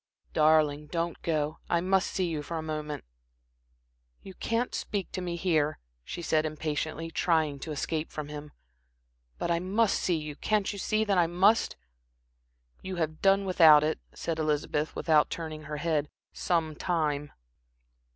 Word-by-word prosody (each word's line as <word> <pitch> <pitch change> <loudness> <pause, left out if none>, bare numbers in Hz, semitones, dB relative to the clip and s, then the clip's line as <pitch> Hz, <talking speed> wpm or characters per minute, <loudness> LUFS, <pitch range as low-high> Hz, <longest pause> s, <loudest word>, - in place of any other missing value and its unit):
"Darling, 150 -1 +3
don't 170 +1 -3
go. 155 -2 -1
I 170 - +3
must 190 +2 +2
see 185 - -1
you 160 -3 -2
for 165 +3 -5
a 160 - -3
moment." 155 -1 -4 1.2
"You 190 - -9
can't 230 +6 -1
speak 200 -4 -3
to 185 - -4
me 175 -1 -3
here," 160 -4 +1 0.3
she 170 - -6
said, 155 -1 +2
impatiently, 155 +1 -3
trying 160 -4 +1
to 155 - -6
escape 155 +2 -2
from 155 -1 -5
him. 150 0 -8 0.9
"But 170 - -1
I 170 - +2
must 195 +4 +1
see 175 -3 +1
you. 150 -1 -6
Can't 210 +4 0
you 200 - -7
see 215 +2 +1
that 200 -4 +2
I 170 - +4
must?" 190 +6 +3 1.1
"You 190 0 -5
have 155 -2 -2
done 195 0 +4
without 160 -5 +7
it," 155 +1 0
said 165 -1 -4
Elizabeth, 150 0 -1
without 155 -2 +3
turning 155 -2 -5
her 150 0 -4
head, 150 -2 0 0.2
"some 160 -3 0
time." 150 -4 -1
160 Hz, 160 wpm, -29 LUFS, 150-180 Hz, 1.2 s, without